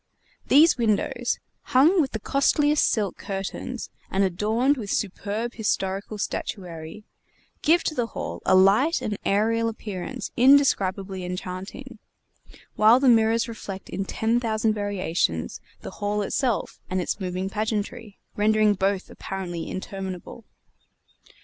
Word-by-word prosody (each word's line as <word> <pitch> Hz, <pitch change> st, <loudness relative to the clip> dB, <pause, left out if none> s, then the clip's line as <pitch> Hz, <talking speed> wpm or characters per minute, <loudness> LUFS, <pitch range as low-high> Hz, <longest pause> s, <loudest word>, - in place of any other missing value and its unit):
These 305 Hz, 0 st, +6 dB
windows, 215 Hz, -3 st, 0 dB, 0.2 s
hung 305 Hz, +7 st, +4 dB
with 270 Hz, -, -2 dB
the 220 Hz, -, -2 dB
costliest 290 Hz, +5 st, +2 dB
silk 210 Hz, -4 st, -1 dB
curtains 195 Hz, +5 st, -5 dB, 0.2 s
and 195 Hz, +1 st, +1 dB
adorned 215 Hz, +9 st, +1 dB
with 220 Hz, -7 st, -6 dB
superb 210 Hz, +4 st, -2 dB
historical 200 Hz, -1 st, -2 dB
statuary, 180 Hz, -2 st, -5 dB, 0.6 s
give 335 Hz, +3 st, +4 dB
to -, -, -1 dB
the 245 Hz, -5 st, -1 dB
hall -, -, -6 dB
a 185 Hz, -, +4 dB
light 205 Hz, -, +4 dB
and 210 Hz, -, -2 dB
aërial 230 Hz, +3 st, +2 dB
appearance 215 Hz, +2 st, -6 dB
indescribably 195 Hz, -8 st, +3 dB
enchanting; 185 Hz, +7 st, -6 dB, 0.8 s
while 220 Hz, +4 st, +6 dB
the 265 Hz, -1 st, +4 dB
mirrors 225 Hz, 0 st, +4 dB
reflect 200 Hz, -4 st, -8 dB
in 195 Hz, +2 st, -3 dB
ten 225 Hz, +4 st, 0 dB
thousand 220 Hz, -2 st, 0 dB
variations 185 Hz, -, -1 dB, 0.2 s
the -, -, -7 dB
hall 205 Hz, 0 st, -2 dB
itself 240 Hz, +2 st, -1 dB
and 185 Hz, -, 0 dB
its 180 Hz, -, -2 dB
moving 185 Hz, 0 st, -3 dB
pageantry, 215 Hz, +1 st, -3 dB, 0.2 s
rendering 215 Hz, 0 st, +3 dB
both 195 Hz, 0 st, 0 dB
apparently 175 Hz, -3 st, -6 dB
interminable. 190 Hz, +3 st, -6 dB
210 Hz, 125 wpm, -25 LUFS, 195-235 Hz, 0.8 s, These